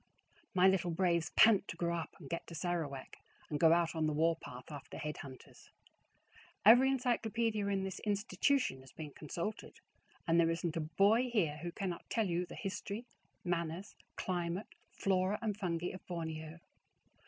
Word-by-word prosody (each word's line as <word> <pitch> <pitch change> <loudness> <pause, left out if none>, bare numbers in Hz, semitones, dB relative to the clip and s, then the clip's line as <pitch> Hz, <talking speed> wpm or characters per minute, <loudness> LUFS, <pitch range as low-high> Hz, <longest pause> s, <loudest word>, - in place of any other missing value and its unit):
My 185 +1 +6
little 190 -2 +3
braves 170 -2 +1
pant 215 -3 +6
to 165 - -6
grow 170 0 0
up 165 -1 -5
and - - -11
get 170 - -4
to 170 - -8
Sarawak, 155 -5 -3 0.3
and 150 - -1
go 160 0 +6
out 170 0 +3
on 160 -2 +1
the 155 - 0
war 165 +2 +3
path 125 -3 -10
after 145 -2 -8
head 150 0 -4
hunters. 130 -2 -11 1.0
Every 245 +5 +8
encyclopedia 230 -4 0
in 195 -1 0
this 190 -1 -4
institution 210 - +1
has 130 -1 -15
been 150 -1 -8
consulted, 170 +9 -5 0.5
and 165 +1 +4
there 165 -1 +5
isn't 165 0 -1
a 165 - 0
boy 200 +11 +3
here 170 -11 +1
who 170 +3 -5
cannot 180 -1 -4
tell 225 -2 +1
you 175 -1 -1
the - - -9
history, 205 +1 -4 0.4
manners, 175 +2 -2 0.2
climate, 175 +2 -2 0.2
flora, 190 +1 +1
and 215 -3 -1
fungi 175 -4 -2
of 185 - -9
Borneo. 160 -2 -5
175 Hz, 165 wpm, -35 LUFS, 165-200 Hz, 1.0 s, Every